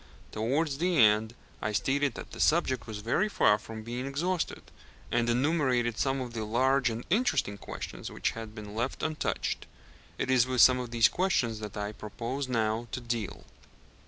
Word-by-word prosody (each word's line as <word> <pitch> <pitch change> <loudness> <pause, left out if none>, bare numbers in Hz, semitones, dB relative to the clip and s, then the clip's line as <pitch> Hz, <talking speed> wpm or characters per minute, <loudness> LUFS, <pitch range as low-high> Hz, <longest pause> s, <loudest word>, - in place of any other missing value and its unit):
Towards 135 +6 0
the 175 0 +1
end 110 -1 +4 0.3
I 110 - -1
stated 135 +6 +1
that - - -8
the - - -9
subject 150 -7 +2
was 105 -2 -6
very 185 - +2
far 105 - +4
from 110 0 -8
being 120 +3 -4
exhausted, 170 +6 -2 0.5
and 120 0 +2
enumerated 125 -3 +1
some 135 +4 +1
of 125 -2 -6
the 110 -2 -3
large 130 +4 +2
and 115 +1 -4
interesting 215 - +2
questions - - -7
which - - -1
had 115 -1 -8
been 105 -2 -8
left 120 +4 -2
untouched. 155 -1 -2 0.5
It 130 - -1
is 130 -1 +4
with 130 -1 +2
some 130 -1 +7
of 125 -1 -4
these 115 -1 +5
questions 125 - 0
that 105 -2 -7
I 105 0 -2
propose 120 +6 -5
now 115 -1 0
to - - -1
deal. 115 -4 -4
120 Hz, 175 wpm, -29 LUFS, 110-135 Hz, 0.5 s, some